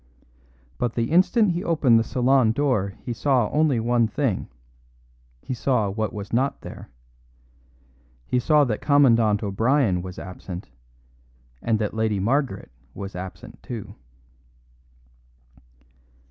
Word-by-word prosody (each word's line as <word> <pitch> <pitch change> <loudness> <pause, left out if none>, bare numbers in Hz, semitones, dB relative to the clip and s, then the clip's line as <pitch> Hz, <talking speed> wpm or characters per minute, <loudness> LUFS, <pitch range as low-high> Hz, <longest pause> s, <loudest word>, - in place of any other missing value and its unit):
But 120 -2 -1
the 115 +3 -1
instant 185 +4 +4
he 175 +2 -3
opened 135 -9 +3
the - - +1
salon 125 -1 +2
door 115 -8 0
he 120 - -2
saw 125 -3 +1
only 150 -5 +2
one 120 0 +2
thing 125 -4 -1 1.0
he - - -4
saw 120 -5 0
what 110 0 -2
was 100 0 -8
not 130 +4 0
there. - - -10 1.4
He 125 - 0
saw 150 +3 +4
that 115 -6 -2
Commandant 115 -7 +4
O'Brien 110 -1 +1
was 90 +1 -8
absent, 90 -2 -8 0.9
and 115 -2 +1
that 105 -1 -2
Lady 110 -2 0
Margaret 115 - -1 0.2
was 100 -1 -7
absent 90 -1 -9
too. 120 -6 -7
115 Hz, 120 wpm, -24 LUFS, 105-135 Hz, 1.4 s, instant